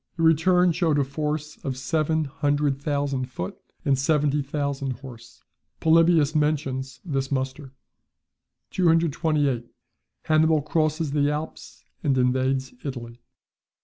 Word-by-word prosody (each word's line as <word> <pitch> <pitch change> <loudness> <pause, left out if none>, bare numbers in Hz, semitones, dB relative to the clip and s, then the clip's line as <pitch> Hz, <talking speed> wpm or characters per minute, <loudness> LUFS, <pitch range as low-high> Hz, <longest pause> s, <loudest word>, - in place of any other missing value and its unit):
The 165 - -1
return 175 +3 +4
showed 165 -3 +1
a 145 - +3
force 150 +2 -3
of 130 -2 -3
seven 155 +3 0
hundred 145 -1 0
thousand 140 -3 -1
foot, 95 -8 -6 0.3
and 135 -2 +2
seventy 150 0 +2
thousand 140 -1 -2
horse. 120 -2 -13 0.4
Polybius 160 -2 +4
mentions 135 -4 -1
this 135 -4 -2
muster. 135 0 -3 1.0
228. 155 -7 +1 0.6
Hannibal 155 -1 +3
crosses 155 0 0
the 145 0 +2
Alps 150 +2 -6 0.2
and 140 -4 +2
invades 130 +1 +1
Italy. 120 -3 -7
145 Hz, 115 wpm, -25 LUFS, 135-155 Hz, 1.0 s, return